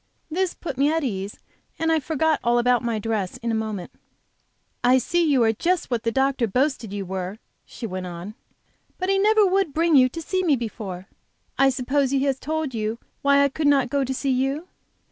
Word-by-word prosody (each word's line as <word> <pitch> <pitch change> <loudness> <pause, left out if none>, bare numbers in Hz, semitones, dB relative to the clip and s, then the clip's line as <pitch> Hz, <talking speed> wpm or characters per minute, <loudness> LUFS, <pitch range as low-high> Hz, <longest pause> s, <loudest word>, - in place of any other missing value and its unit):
This 365 +2 0
put 275 -6 -6
me 285 +2 +4
at 325 0 0
ease, 200 -5 -3 0.4
and 325 0 +1
I 320 - +3
forgot 315 +1 +1
all 240 0 +3
about 245 0 +3
my 235 -2 -1
dress 210 -3 -2
in 230 0 -3
a - - -1
moment. 215 -4 -3 0.9
"I 250 +1 +5
see 345 +7 +1
you 280 -6 +3
are 225 0 +3
just 345 - -1
what 235 -2 0
the 230 0 -1
doctor 265 -1 +1
boasted 250 -1 0
you 200 -1 -4
were," 185 +2 -4 0.3
she 235 - -8
went 185 -3 -4
on. 175 +4 -7 0.6
"But 370 +1 -2
he 390 0 +3
never 425 +1 +5
would 380 -5 +1
bring 330 0 +3
you 255 -2 +6
to 330 - -7
see 375 +4 -1
me 325 -6 +3
before. 210 -6 -6 0.5
I 270 0 +4
suppose 265 +1 0
he 270 0 +1
has 270 -2 0
told 310 -2 -3
you 220 0 -2 0.2
why 280 0 +4
I 280 - +3
could 295 +2 -1
not 270 -3 +3
go 280 -1 +1
to 265 - -3
see 270 +1 -1
you?" 270 +6 -1
265 Hz, 210 wpm, -24 LUFS, 225-310 Hz, 0.9 s, you